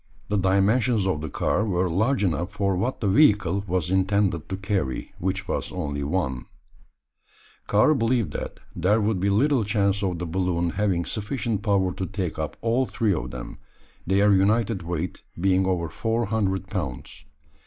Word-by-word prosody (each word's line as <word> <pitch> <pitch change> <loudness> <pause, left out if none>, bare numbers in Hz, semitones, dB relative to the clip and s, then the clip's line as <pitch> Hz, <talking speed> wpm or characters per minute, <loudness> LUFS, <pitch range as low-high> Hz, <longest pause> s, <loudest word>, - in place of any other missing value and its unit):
The 105 - +1
dimensions 100 +4 +2
of 95 -6 0
the 80 - -4
car 105 - 0
were 95 -3 0
large 110 +8 +1
enough 85 +1 -1
for 100 -2 0
what 120 +8 -2
the 105 - +1
"vehicle" 100 - +4
was 90 -1 -1
intended 95 -3 +1
to 95 - -3
carry, 95 -9 -2
which 95 +1 -2
was - - -2
only 70 0 -3
one. 70 -5 -2 1.2
Karl 105 +9 +4
believed 120 -4 0
that - - -5 0.2
there 95 +6 +2
would 105 -2 0
be 100 +2 +1
little 125 +5 +3
chance 100 -1 +1
of 95 -3 -1
the 90 - -4
balloon 85 0 0
having 95 -3 0
sufficient 110 -1 -2
power 95 -3 +1
to 95 - -4
take 95 -5 -4
up 80 - -4
all 120 +3 +1
three 110 -3 +1
of 80 - -3
them, 60 -1 -8 0.5
their 100 +2 +4
united 105 +1 +2
weight 85 0 -4 0.2
being 95 +1 +2
over 90 -3 0
four 115 +8 -1
hundred 95 -3 -1
pounds. 70 -7 -5
95 Hz, 165 wpm, -25 LUFS, 90-105 Hz, 1.2 s, vehicle